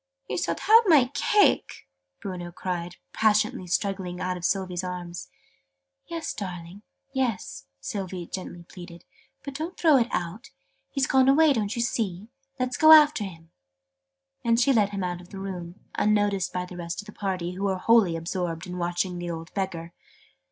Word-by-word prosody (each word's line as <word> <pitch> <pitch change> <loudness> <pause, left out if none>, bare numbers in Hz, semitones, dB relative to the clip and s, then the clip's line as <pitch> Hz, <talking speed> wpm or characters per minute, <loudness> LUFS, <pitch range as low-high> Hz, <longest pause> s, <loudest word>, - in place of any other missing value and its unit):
"He - - -5
shalt - - -2
have 450 +2 +7
my 275 -7 +5
cake!" 415 +6 +2 0.4
Bruno 180 -3 -5
cried, 175 -1 -4 0.2
passionately 215 -3 +2
struggling 185 -1 -2
out 185 0 -2
of 180 - -8
Sylvie's 185 -1 -1
arms. 180 -1 -6 0.8
"Yes, 335 -1 -4 0.8
yes, 230 - -2
darling!" - - -38
Sylvie 185 - -5
gently 175 -1 -7
pleaded. 175 -1 -12 0.4
"But 280 - -6
don't 320 +6 -5
throw 315 -5 +5
it 235 -2 +2
out! 180 +7 -4 0.4
He's 275 -2 0
gone 265 0 +4
away, 300 +1 +5
don't 215 -4 -1
you 235 - 0
see? 210 -3 -2 0.3
Let's 255 0 -1
go 315 0 +7
after 300 -7 +6
him." 165 -4 -10 0.9
And 230 0 +3
she 270 +3 +4
led 210 -4 +3
him 200 -2 -4
out 175 -1 -3
of 175 - -16
the 195 - -9
room, 180 -3 -6 0.2
unnoticed 205 -3 +1
by 180 0 -3
the 180 0 -10
rest 170 +3 -5
of - - -20
the 210 - -10
party, 185 -4 -3
who 190 +2 -4
were 190 -1 0
wholly 205 -4 +4
absorbed 165 0 -3
in 180 -1 -6
watching 175 +1 -1
the 175 0 -4
old 165 0 -6
Beggar. 170 -4 -4
190 Hz, 170 wpm, -26 LUFS, 175-230 Hz, 0.9 s, have